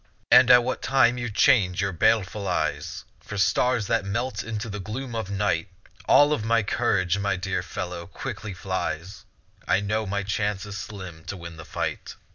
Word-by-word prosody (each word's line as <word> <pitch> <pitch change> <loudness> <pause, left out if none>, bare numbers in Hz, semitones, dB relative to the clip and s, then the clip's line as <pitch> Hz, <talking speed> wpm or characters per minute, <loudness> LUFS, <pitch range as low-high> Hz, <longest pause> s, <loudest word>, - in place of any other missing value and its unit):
And 130 - +8
at 125 -1 +8
what 130 - -3
time 125 -1 +3
you 120 0 -3
change 105 -5 +3
your 100 0 0
baleful 105 +1 +1
eyes 85 -4 -2
For 105 - -8
stars 120 +3 +2
that 115 0 +1
melt 100 +7 -2
into 110 0 -4
the 105 -1 -5
gloom 120 +6 -5
of 110 -4 -3
night, 100 -4 0 0.4
All 145 +1 +6
of 130 - -2
my 115 0 +2
courage, 100 -4 +1
my 100 -1 0
dear 95 +1 -2
fellow, 85 -1 -6
quickly 105 -2 -6
flies; 95 0 -4 0.4
I - - +3
know 110 +1 -1
my 100 +1 -1
chance 105 0 -1
is 105 -1 -7
slim 95 -6 -8
to 100 - -5
win 85 -1 -9
the 80 - -10
fight. - - -4
100 Hz, 180 wpm, -25 LUFS, 95-115 Hz, 0.4 s, And